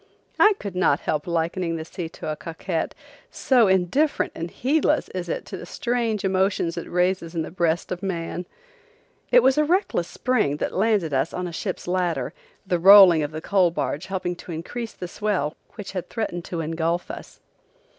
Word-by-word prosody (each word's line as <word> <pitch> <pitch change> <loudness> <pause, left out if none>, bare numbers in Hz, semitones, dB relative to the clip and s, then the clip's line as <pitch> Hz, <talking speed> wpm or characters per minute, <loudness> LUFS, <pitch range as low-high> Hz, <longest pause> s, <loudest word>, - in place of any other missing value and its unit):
I 425 - +7
could 200 -3 -6
not 185 - +2
help 150 +1 -2
liking 170 0 -1
the 160 -1 -5
sea 165 0 -6
to 160 - -7
a - - -3
coquette, 165 +2 -4 0.3
so 245 -5 +3
indifferent 190 - +2
and 165 +1 -5
heedless 295 - +1
is 180 -2 -5
it - - -3
to - - -7
the - - -8
strange 235 -6 -1
emotions 190 -3 +1
it 170 - -6
raises 180 -1 0
in 165 - 0
the - - -7
breast 170 -1 0
of 180 -1 -3
man. 175 -2 -4 0.8
It - - +7
was 265 +3 +4
a - - +5
reckless 335 - +1
spring 220 - 0
that - - -3
landed 195 -6 +1
us 135 +4 0
on 180 - -3
the 175 - -6
ship's 185 +1 -4
ladder, 175 -7 -1 0.3
the 180 -2 0
rolling 190 -3 +9
of 145 - -1
the 155 +1 -6
coal 190 -2 +3
barge 170 0 -3
helping 180 -2 -2
to 175 - -10
increase 225 +8 -5
the 180 - -7
swell 180 -6 -1 0.2
which 210 -3 -7
had 185 -3 -5
threatened 175 -6 -3
to 170 -2 -4
engulf 165 +2 -1
us. - - -10
180 Hz, 185 wpm, -24 LUFS, 165-205 Hz, 0.8 s, rolling